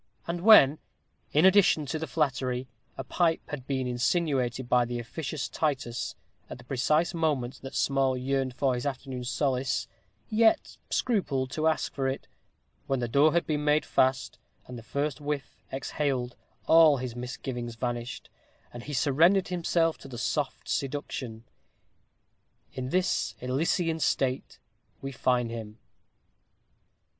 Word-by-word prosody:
And 170 0 -3
when, 155 -9 +7 0.5
in 155 +4 +4
addition 190 -5 +5
to 155 +3 -3
the 160 - -4
flattery, 130 -4 -1 0.3
a 135 - -4
pipe 165 +5 0
had 130 -4 -6
been 130 -2 -1
insinuated 125 -1 0
by 125 0 +4
the 120 0 -3
officious 140 +5 -4
Titus, 130 -6 -2 0.3
at - - -7
the 120 - -14
precise 150 +7 +1
moment 145 -7 -1
that 135 +1 -8
Small 135 -2 +1
yearned 130 0 -1
for 135 -1 +1
his 125 +3 -2
afternoon's 130 -2 -4
solace, 130 -2 0 0.4
yet 220 0 +2
scrupled 140 - 0
to 155 +3 0
ask 160 - 0
for 135 -1 -1
it; 135 +1 -4 0.6
when 135 -1 0
the 120 - -1
door 140 +6 +4
had 170 - +2
been 150 -1 -1
made 150 +1 +2
fast, 130 0 +1 0.3
and 125 - -9
the 115 - -8
first 140 +4 -3
whiff 145 -1 -4
exhaled, 135 -2 -2 0.3
all 160 -3 +6
his 125 -2 -5
misgivings 120 -1 -5
vanished, 120 0 -4 0.4
and 120 0 -8
he 145 - -6
surrendered 165 +9 +3
himself 170 -2 +1
to - - -11
the 125 -3 -8
soft 115 - -2
seduction. 130 -5 -3 1.3
In 130 0 -4
this 185 +4 0
Elysian 160 +6 0
state 135 -3 -1 0.4
we 135 - -5
find 125 -2 0
him. 110 -2 -7
135 Hz, 140 wpm, -28 LUFS, 125-155 Hz, 1.3 s, when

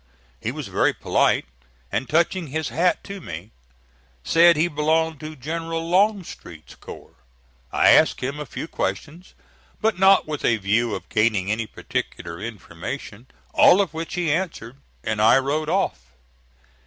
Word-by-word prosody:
He - - -3
was - - -6
very - - +1
polite, - - +1 0.5
and, 130 - -2
touching 170 +2 +1
his 155 +2 -3
hat 175 +3 +1
to 200 -1 -8
me, 90 - -8 0.7
said 170 - +5
he 160 +3 +3
belonged 160 0 0
to 155 0 -8
General 165 +4 -4
Longstreet's 185 - -1
corps. - - -12 0.5
I - - +4
asked - - +5
him 140 +4 -4
a 150 - -6
few - - -6
questions 165 +2 -5 0.4
but 220 -4 0
not 195 -2 +5
with 150 -2 -4
a 115 - +3
view 110 +3 0
of - - -8
gaining 105 -3 +1
any 110 0 -2
particular 85 -3 -5
information 110 +2 -7 0.3
all 185 - +6
of 190 -6 0
which 165 +3 -5
he 175 -4 0
answered, 150 -8 -3 0.3
and 110 -1 -1
I 115 +4 +6
rode 150 +3 -1
off. - - 0
150 Hz, 150 wpm, -23 LUFS, 115-170 Hz, 0.7 s, all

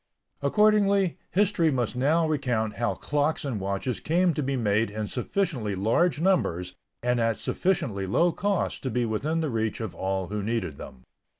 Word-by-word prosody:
Accordingly 200 +3 +3
history 190 -4 +2
must 125 -4 -1
now 155 +6 +2
recount 125 -8 -1
how 120 0 0
clocks 145 +1 -1
and 125 -7 -2
watches 100 +3 -2
came 175 - +2
to 150 - -2
be 135 0 -1
made 110 -2 +1
in 105 0 -4
sufficiently 125 - -2
large 120 - +2
numbers 90 - +1 0.3
and 125 0 +1
at 115 -1 +1
sufficiently 110 - -1
low 170 - +3
cost 200 +1 -1
to 130 - -2
be 125 -1 0
within 150 +9 -1
the 155 -4 -1
reach 110 -1 -1
of 110 -6 -4
all 95 +1 -2
who 105 0 -2
needed 110 -9 -2
them. 65 - -10
125 Hz, 170 wpm, -26 LUFS, 105-165 Hz, 0.3 s, Accordingly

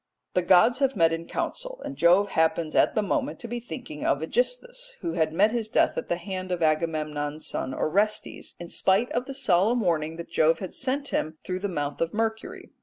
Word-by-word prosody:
The 180 - +2
gods 185 +8 +5
have 270 -2 +2
met 165 -3 +4
in 165 +1 -4
council, - - -4
and - - -5
Jove 175 +7 +4
happens 160 0 +1
at - - +3
the 215 - +2
moment 280 +7 -1
to 235 - -6
be 240 +1 -4
thinking 240 - -8
of - - +2
AEgisthus, - - -2
who 335 - -2
had 160 -1 +1
met 205 +7 +3
his 225 -2 -2
death - - +2
at - - -4
the 175 - +1
hand 185 0 -5
of 175 -2 -1
Agamemnon's 155 -1 -1
son 130 - -2
Orestes, 205 +10 -1
in 175 0 -8
spite 195 +6 +2
of 250 - -1
the 275 - -6
solemn 230 -1 +3
warning 160 -4 0
that 170 0 -9
Jove 160 +1 +3
had 190 - -7
sent 280 +2 -2
him 155 +1 -2
through 185 0 -3
the 205 - -2
mouth 145 -6 -3
of 165 +4 -1
Mercury. 220 0 -3
185 Hz, 210 wpm, -26 LUFS, 165-240 Hz, -, gods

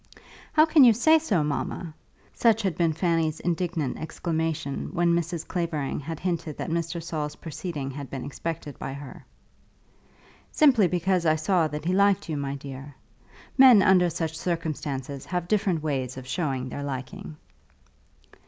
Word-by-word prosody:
"How 310 0 +6
can 315 -3 +6
you 240 -3 +8
say 315 +9 +5
so, 205 - +1
mamma?" 155 +3 -3 0.4
Such 225 -2 +3
had 190 -5 0
been 165 -1 +2
Fanny's 165 -1 0
indignant 170 -4 -2
exclamation 160 -3 -3
when 175 -1 +2
Mrs. 170 -1 -2
Clavering 170 -6 -2
had 160 +2 -6
hinted 170 -4 -3
that 170 - -4
Mr. 170 0 -2
Saul's 150 -3 -4
proceeding 155 -3 -5
had 140 -1 -7
been 135 -1 -5
expected 150 0 -5
by 135 - -5
her. 140 -1 -10 1.3
"Simply 250 -10 +5
because 180 0 +1
I 155 - +4
saw 165 +1 +2
that 150 +1 -6
he 180 - +1
liked 200 0 +3
you, 155 - -1
my 140 -1 -3
dear. 135 0 -9 0.6
Men 250 -7 +9
under 180 -2 +5
such 160 -1 -3
circumstances 150 -5 -3
have 180 -1 -3
different 190 -6 +1
ways 130 -4 -2
of 130 - -8
showing 130 -3 -2
their 145 - -5
liking." 145 +6 -6
165 Hz, 155 wpm, -26 LUFS, 145-180 Hz, 1.3 s, Men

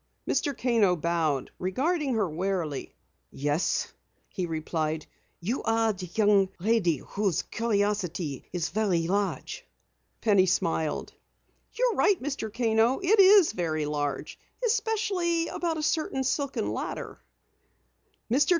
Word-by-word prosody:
Mr. 285 -3 0
Kano 225 -7 +3
bowed, 160 -5 -1
regarding 270 - 0
her 210 -4 +1
warily. 170 -3 -3 0.3
"Yes," 145 +5 -1 0.4
he 180 -2 -3
replied. 155 -1 -2 0.3
"You 220 +10 -2
are 225 -1 +2
the 185 -2 -8
young 205 -3 +4
lady 185 -4 +2
whose 195 -5 0
curiosity 200 - -1
is 175 -2 -2
very 190 -5 +1
large." 195 -6 -2 0.6
Penny 200 -4 +4
smiled. 160 -3 0 0.6
"You - - +2
are - - -8
right, 405 -4 +4
Mr. 270 -6 -4
Kano. 225 +2 +2
It 395 +3 +3
is 390 -2 +7
very 160 -6 -1
large, 145 -1 -3 0.3
especially 405 -8 0
about 335 -2 -2
a 310 - -3
certain 310 -4 0
silken 260 - -1
ladder." - - -5 1.1
Mr. 270 +4 +3
205 Hz, 120 wpm, -27 LUFS, 170-270 Hz, 1.1 s, is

